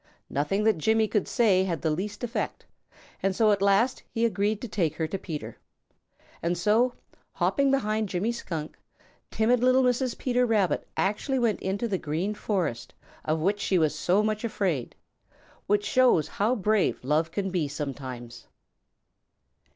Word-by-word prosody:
Nothing 150 +9 0
that 215 -6 +3
Jimmy 220 +6 +2
could 210 -2 0
say 200 -6 +3
had 170 -4 -2
the 160 - +2
least 205 +8 -4
effect, 240 0 -3 0.6
and 195 -1 0
so 215 0 +4
at 200 -1 +1
last 200 +6 +3
he 230 0 0
agreed 210 -1 0
to 245 - -4
take 170 -8 -1
her 160 - -1
to 190 +5 -4
Peter. 155 -4 -7 0.8
And 170 +1 0
so, 220 +7 +2 0.4
hopping 280 -1 +1
behind 215 -6 0
Jimmy 190 +6 0
Skunk, 165 -9 -6 0.5
timid 235 +3 +2
little 255 +2 +4
Mrs. 250 0 +1
Peter 250 -1 +1
Rabbit 215 -6 +1
actually 210 +7 0
went 235 -4 +1
into 200 +5 -1
the 195 -4 -1
Green 165 +7 -2
Forest 185 - -3 0.3
of 155 0 0
which 200 +5 +1
she 195 -2 +1
was 155 -3 +2
so 190 +4 +2
much 215 0 -1
afraid, 185 - -2 0.7
which 205 0 +2
shows 245 - +3
how 215 +9 0
brave 215 - +1
love 155 +5 +1
can 195 +2 -3
be 175 -5 0
sometimes. 130 -4 -7
200 Hz, 160 wpm, -27 LUFS, 165-225 Hz, 0.8 s, so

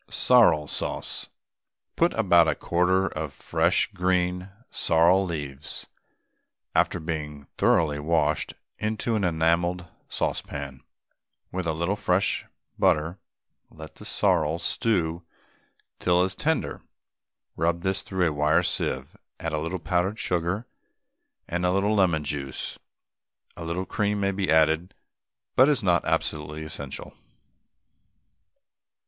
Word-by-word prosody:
SORREL 75 -1 +5
SAUCE. - - -2 0.7
Put 170 +1 +3
about 85 -6 +5
a - - +1
quart 95 +2 +1
of 80 -2 -4
fresh 85 +8 +1
green 90 0 0 0.2
sorrel 85 +4 +4
leaves 75 -6 -5 0.9
(after 90 - +2
being 75 -3 -5 0.2
thoroughly 75 -3 +3
washed) 75 0 0 0.2
into 110 +2 -1
an 105 -2 0
enamelled 85 +1 +1 0.2
saucepan, 70 -2 -3 0.7
with 90 -1 -3
a 80 - +1
little 85 +5 -1
fresh 95 -2 +1 0.3
butter, 80 +5 +2 0.5
and - - -21
let 80 -1 -10
the - - -14
sorrel 85 -5 +1
stew 85 -1 0 0.8
till 90 0 +3
it - - +3
is 95 0 -4
tender. 160 +8 -1 0.7
Rub 85 +1 0
this 95 0 0
through 95 -2 0
a 80 - -1
wire 75 +1 +3
sieve, - - -2 0.2
add 80 -1 -3
a 75 - 0
little 80 +4 -3
powdered 90 +4 0
sugar 90 +5 -1 0.8
and 90 +1 -2
a 90 - +3
little 100 +3 +2
lemon 90 -7 +2
juice; 70 -2 -3 0.8
a 85 - -7
little 85 +3 -3
cream 105 +1 -1
may 100 0 +1
be 95 -2 -2
added, 80 +2 +3 0.6
but 130 +3 +6
is 145 -7 +1
not 90 -2 +3
absolutely 75 0 -1
essential. 70 -4 -6
85 Hz, 125 wpm, -26 LUFS, 80-95 Hz, 0.9 s, but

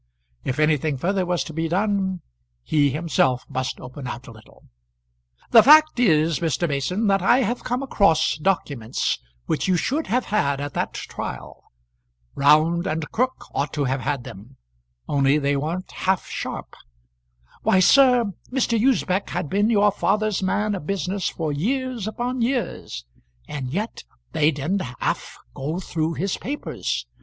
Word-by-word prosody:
If 130 - -2
anything 155 -1 +2
further 185 +5 0
was 175 -1 0
to 160 - -9
be 165 +1 -1
done, 190 0 0 0.4
he 145 -2 +2
himself 135 -4 +1
must 130 -2 -3
open 130 +1 -8
out 120 +1 -6
a - - -11
little. 110 -1 -17 0.9
"The 225 - +9
fact 310 +1 +6
is, 160 - +3
Mr. 170 +1 0
Mason, 155 +9 -1
that 195 -2 +3
I 240 +8 +4
have 240 +1 -2
come 250 +2 -2
across 200 - +3
documents 140 - -1 0.3
which 160 - -1
you 185 -1 +3
should 290 - -1
have 250 +3 0
had 140 -10 0
at 145 0 -4
that - - -2
trial. - - -7 0.7
Round 155 +4 +3
and 155 -1 -3
Crook 255 +2 -1
ought 140 +1 -1
to 145 - 0
have 135 0 -1
had 135 -2 -2
them, 110 +7 -12 0.5
only 140 0 +3
they 140 -1 +1
weren't 165 +6 -3
half 190 -1 0
sharp. - - -6 0.9
Why, 190 - +3
sir, 250 +1 +5 0.2
Mr. 240 -4 +1
Usbech 205 -7 +1
had 175 -4 -3
been 205 +3 +2
your 205 -2 +4
father's 210 +1 0
man 205 +3 0
of 180 -6 -5
business 195 -1 -1
for 160 -3 -3
years 245 - -2
upon 245 +3 -3
years, 230 - -2 0.4
and 135 -4 -5
yet 210 +8 -3 0.3
they 155 -2 +3
didn't 160 +7 -1 0.2
half - - -2 0.2
go 155 +6 -3
through 165 -3 -2
his 195 +2 -1
papers. 280 +8 -3
175 Hz, 155 wpm, -23 LUFS, 145-210 Hz, 0.9 s, The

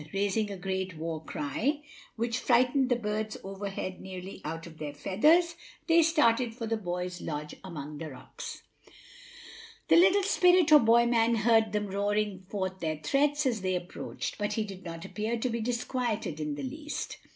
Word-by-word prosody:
Raising 205 +2 0
a 200 - -5
great 190 -2 -3
war 160 0 -4
cry, 255 - -2 0.3
which 235 +1 -1
frightened 255 +2 +3
the 245 - +4
birds 215 -1 -3
overhead 195 -1 -5
nearly 190 0 -8
out 165 +1 -5
of 160 -2 -12
their 145 -2 -5
feathers, 310 - +3 0.3
they 335 0 +5
started 250 -8 +3
for 230 -2 -4
the 225 0 0
boy's 180 -3 -4
lodge 150 -1 -4
among 150 -5 -7
the 160 -1 -5
rocks. 130 - -9 1.3
The - - +7
little 380 +3 +6
spirit 360 -4 +4
or 300 - +10
boy 235 -1 +5
man 235 -1 +3
heard 225 -1 +3
them 210 -1 0
roaring 200 -1 -1
forth 190 -2 -3
their 155 -3 -2
threats 285 - +1
as 235 -6 +1
they 185 0 0
approached, 175 0 -5
but 205 0 -1
he 220 - 0
did 195 -2 -9
not 165 -1 -7
appear 220 +2 -2
to 250 +3 -1
be 235 0 -2
disquieted 230 - -2
in 150 -1 -2
the - - -6
least. 295 +3 -5
210 Hz, 175 wpm, -29 LUFS, 180-245 Hz, 1.3 s, or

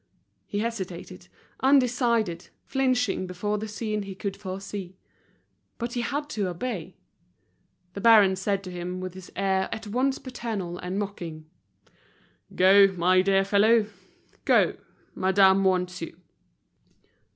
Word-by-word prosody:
He 205 - -4
hesitated, 200 -6 -5 0.3
undecided, 240 -9 +2 0.2
flinching 250 -8 0
before 205 +4 -2
the 220 - -5
scene 215 0 -3
he 195 -1 -7
could 195 0 -4
foresee. 190 -1 -7 0.8
But 240 0 -4
he 240 - -1
had 290 +4 -2
to 205 -3 -1
obey. 185 +8 -5 1.0
The 200 - -6
baron 210 -4 +6
said 195 +1 -1
to 185 - -7
him, 180 +1 -5
with 185 -1 -6
his 185 -1 -11
air 190 -1 0
at 220 0 -5
once 255 +6 0
paternal 220 -9 -5
and 180 +2 -4
mocking, 175 -6 -5 1.1
"Go, 195 +2 +7
my 185 +1 +3
dear 195 0 +2
fellow, 210 +3 +4 0.6
go, - - +3 0.4
madame 190 +1 +4
wants 180 -2 0
you." 165 +1 -7
195 Hz, 125 wpm, -26 LUFS, 185-225 Hz, 1.1 s, Go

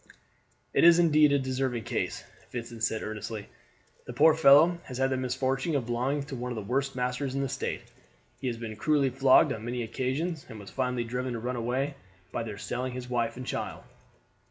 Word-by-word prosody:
"It - - +3
is 170 0 +8
indeed 155 -3 +5
a 140 - +4
deserving 130 -3 -1
case," - - -3 0.3
Vincent 115 -1 -6
said 110 -1 0
earnestly. 110 0 -5 0.6
"The 125 - -6
poor 155 +5 +6
fellow 160 +3 +6
has 125 - -7
the 135 0 +1
misfortune 130 +4 -1
of 135 -4 0
belonging 125 +5 -1
to 140 -1 -7
one 125 0 -4
of - - -3
the 110 - -4
worst 135 +5 -1
masters 125 +2 -2
in 140 - 0
the 135 - 0
State. 135 +1 -3 0.6
He 130 - -3
has 120 -2 -2
been 115 -2 -6
cruelly 140 +1 +2
flogged 130 +1 +5
on 110 - -7
many 120 +1 -3
occasions, 140 +7 -2
and 110 - -8
was 100 - -11
finally 125 -2 -1
driven 125 +2 -3
to 115 - -3
run 125 +2 -3
away 125 +4 -1 0.4
by - - -2
their 110 -3 -6
selling 125 +3 -3
his 125 0 -7
wife 115 -1 0
and 130 - -6
child." - - -4
125 Hz, 200 wpm, -28 LUFS, 120-140 Hz, 0.6 s, is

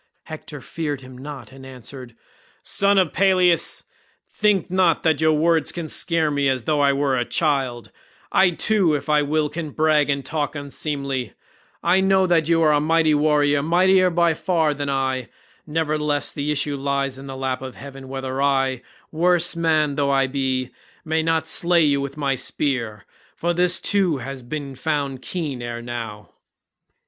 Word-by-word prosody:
Hector 155 -2 -9
feared 145 -3 -4
him 130 0 -12
not 130 -3 -9
and 135 0 -13
answered, 130 -1 -10 0.5
"Son 200 0 +2
of 185 -6 +2
Peleus, 185 -2 +2 0.5
think 205 -5 +1
not 180 -4 +2
that 160 -2 +2
your 155 0 +4
words 160 +1 +2
can 170 -2 -5
scare 160 0 0
me 140 -1 +1
as 130 -3 -1
though 150 -2 +1
I 140 -1 +4
were 140 -1 0
a 120 - +1
child; 135 -6 -1 0.4
I 190 -1 +5
too 180 -2 +1
if 145 +1 -5
I 150 -1 +4
will 150 +1 0
can 160 0 -5
brag 155 0 +2
and 140 -2 -1
talk 150 0 -2
unseemly; 140 -4 -4 0.5
I 190 - +3
know 190 0 +3
that 165 -3 +2
you 165 -1 +3
are 155 - +4
a 145 - +3
mighty 160 +1 +2
warrior, 145 -1 +2
mightier 185 +4 +4
by 170 -1 +2
far 160 -2 0
than 145 0 -4
I, 130 -2 -1 0.4
nevertheless 150 -2 -1
the 145 0 -3
issue 145 -1 -1
lies 140 -1 -2
in 135 - -10
the 135 -1 -7
lap 130 -1 -2
of 130 -1 -7
heaven 135 -1 -10
whether 135 0 -4
I, 135 -2 +1 0.3
worse 175 +2 +2
man 155 -3 +1
though 140 -1 +1
I 135 -1 +3
be, 130 -1 -2 0.3
may 160 0 +1
not 160 -1 0
slay 170 +1 +2
you 140 -2 +2
with 140 +1 -6
my 140 -2 0
spear, 120 -5 -2 0.3
for 175 +1 -1
this 180 +1 +2
too 185 -5 +1
has 135 +1 -7
been 140 +2 -6
found 140 -2 -2
keen 150 -8 -4
ere 120 0 -5
now." 115 -3 -7
145 Hz, 175 wpm, -22 LUFS, 135-165 Hz, 0.5 s, I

